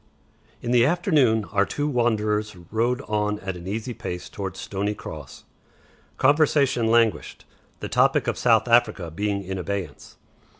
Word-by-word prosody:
In 120 - -2
the 120 -1 +5
afternoon 140 - +2
our 100 - +3
two 145 +8 -2
wanderers 110 -5 0 0.2
rode 120 +4 0
on 105 -2 -1
at 95 -1 -4
an 90 +1 -9
easy 110 +5 -4
pace 90 -5 -6
towards 95 -2 -6
Stoney 100 +1 -3
Cross. - - -10 0.7
Conversation 140 -4 +3
languished, 115 -1 +1 0.4
the - - -3
topic - - +2
of - - -1
South 115 -1 +3
Africa 115 -8 +2
being 100 +3 -2
in 95 0 -5
abeyance. 100 0 -6
110 Hz, 140 wpm, -24 LUFS, 100-120 Hz, 0.7 s, the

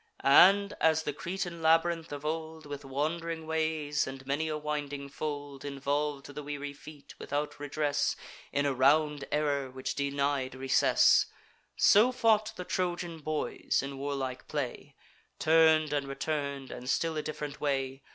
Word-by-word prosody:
And, 200 +8 +6
as 160 0 +3
the 145 - -2
Cretan 175 +2 -4
labyrinth 165 0 +2
of 145 0 -6
old, 160 0 -4
With 145 -1 -7
wand'ring 160 +4 -3
ways 155 -2 0
and 135 0 -8
many 145 +4 -1
a 155 -1 -2
winding 145 -2 -4
fold, 145 -1 -5
Involv'd 140 0 -2
the 150 - -6
weary 145 0 -5
feet, 145 0 -13
without 145 +1 -3
redress, 145 0 0 0.4
In 145 0 +1
a 140 - +1
round 145 +2 +3
error, 145 -3 0
which 130 0 -4
denied 140 -2 -1
recess; 130 0 +4 0.5
So 220 +5 +6
fought 220 -3 +2
the 180 - -6
Trojan 175 -2 -2
boys 155 -2 -1
in 135 0 -6
warlike 135 -2 -4
play, 140 -1 -4 0.4
Turn'd 160 -1 +4
and 140 -1 -1
return'd, 140 -1 -3
and 125 +1 -7
still 165 +2 +1
a 155 - -1
diff'rent 150 -1 -6
way. 135 -2 -1
145 Hz, 145 wpm, -30 LUFS, 140-160 Hz, 0.5 s, And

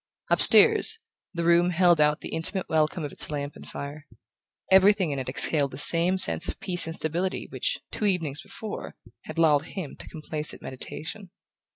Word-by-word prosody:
Upstairs, 450 - +5 0.3
the 170 -2 -5
room 170 +1 +3
held 175 -2 +2
out 150 0 +1
the - - -8
intimate 175 +4 -2
welcome 155 +1 -1
of 145 - -7
its - - -1
lamp 145 -1 -6
and - - -13
fire. 145 +1 -9 0.6
Everything 190 -3 +4
in 140 - -4
it 130 - -6
exhaled 140 +2 +5
the 130 - -11
same 170 +5 +5
sense 185 - +3
of - - -6
peace 180 -3 -1
and 165 - -6
stability 170 +4 -4
which, - - -3
two 215 - -4
evenings 165 -8 -2
before, 215 -2 -9 0.3
had - - -9
lulled 155 -2 +2
him 175 -6 -8
to - - -8
complacent 155 -1 -5
meditation. 175 +9 -9
165 Hz, 175 wpm, -25 LUFS, 150-185 Hz, 0.6 s, Upstairs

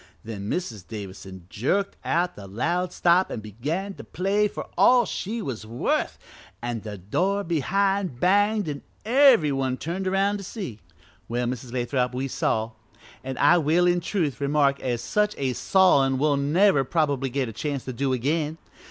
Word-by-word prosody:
Then 105 -2 -6
Mrs. 115 - -4
Davison 95 -3 -8
jerked 165 - -1
out 175 +2 0
the 100 -1 -10
loud 170 - -1
stop 180 +2 +3
an' - - -4
began 145 - -4
to - - -10
play 200 +3 0
for - - -6
all 245 -1 +5
she 220 +3 -4
was 120 - -5
worth, 115 +3 -1 0.4
an' 120 0 -3
the 105 -2 -7
door 185 - 0
behind 185 -1 0
banged 205 +3 +3
an' 145 -2 -4 0.2
every 245 - +5
one 130 -1 -1
turned 180 +6 -3
aroun' 195 +2 +1
to 200 - -8
see. 180 - -6 0.5
"Well, 120 +1 -1
Mrs. 125 0 -4
Lathrop, 125 0 -1
we 130 +2 -2
saw, 110 -3 -1 0.5
an' 130 -1 -5
I 145 +5 +5
will 165 +3 +3
in 175 0 +3
truth 165 - -2
remark 140 -1 +2
as 120 -3 -2
such 210 +10 +1
a 130 -2 -1
sawin' 140 -7 +3
we'll 145 +1 +2
never 145 +2 +3
probably 140 -2 0
get 135 0 -1
a 115 - -7
chance 140 +2 -3
to 130 - -4
do 135 +2 -1
again! 150 +5 -1
145 Hz, 170 wpm, -25 LUFS, 125-185 Hz, 0.5 s, all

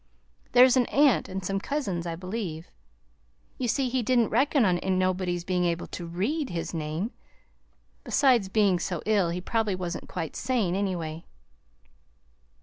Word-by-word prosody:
(There's 250 +1 +7
an 245 - +3
aunt 280 -4 +3
and 190 0 -5
some 195 +1 -1
cousins, 195 - -3
I 165 - -3
believe.) 185 -3 -5 0.9
You 250 - -1
see 260 +3 +1
he 255 +1 0
didn't 240 -1 +2
reckon 275 -3 +3
on 180 -2 +2 0.2
nobody's 185 -1 0
being 180 0 0
able 170 0 -1
to 175 - -7
READ 245 - -2
his 170 0 -4
name! 160 +7 -3 0.9
Besides, 245 -9 +3
being 195 -3 +3
so 175 -1 -3
ill, 205 -5 +2
he 175 +2 -3
probably 215 0 0
wasn't 180 -1 -5
quite 160 - -5
sane, 230 -9 0
anyway." 175 -5 -2
190 Hz, 145 wpm, -27 LUFS, 175-240 Hz, 0.9 s, There's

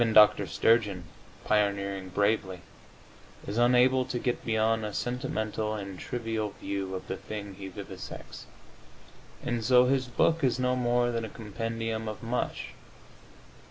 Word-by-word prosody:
Even 115 -1 +3
Dr. 105 -1 +7
Sturgeon, 105 -5 +2 0.4
pioneering 100 -2 0
bravely, 100 -2 0 0.8
is 105 +3 -2
unable 125 +2 +5
to 125 -1 -3
get 120 0 -1
beyond 110 0 +1
a 105 -1 -4
sentimental 110 -3 -2
and 100 -3 -6
trivial 110 -4 -3
view 95 -1 -3
of 95 - -6
the 95 - -3
thing 100 -2 -6
he 95 0 -8
vivisects, 90 - -8 1.0
and 120 -1 -1
so 125 +2 +6
his 130 0 +1
book 160 +6 +2
is 130 -2 +3
no 125 0 +1
more 120 -1 +2
than 115 -1 -2
a 110 - -4
compendium 115 +1 -4
of 110 +2 -6
mush. 120 +2 -2
110 Hz, 140 wpm, -29 LUFS, 100-120 Hz, 1.0 s, Dr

